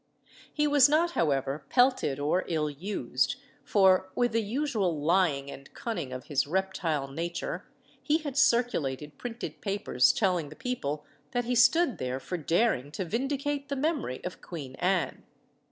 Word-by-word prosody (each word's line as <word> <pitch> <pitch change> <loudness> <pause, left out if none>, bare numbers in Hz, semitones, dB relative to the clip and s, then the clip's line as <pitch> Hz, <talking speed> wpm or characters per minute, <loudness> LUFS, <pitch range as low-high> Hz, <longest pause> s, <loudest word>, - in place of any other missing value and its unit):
He 300 - +1
was 290 -2 +6
not, 330 +3 +3
however, 140 - 0
pelted 250 - +3
or 150 +6 +1
ill 155 -3 0
used; 145 - -1 0.3
for, 190 -2 +4
with 245 -1 +2
the 230 +1 +1
usual 215 - -1
lying 150 -4 +2
and 135 0 -11
cunning 175 - -4
of 130 0 -6
his 140 -1 0
reptile 170 -5 -1
nature, 165 +5 -4 0.3
he 305 +1 +2
had 295 -5 -6
circulated 165 - +1
printed 240 -1 -6
papers 195 - +2
telling 180 -8 0
the 150 - -11
people 150 - -3 0.3
that 245 -1 0
he 250 - 0
stood 260 +4 +4
there 130 +1 -2
for 180 - -5
daring 165 - +1
to 190 - -3
vindicate 280 - -2
the 280 - -1
memory 280 - -2
of 180 - -6
Queen 145 -7 -7
Anne. 180 -1 0
190 Hz, 155 wpm, -29 LUFS, -, 0.3 s, was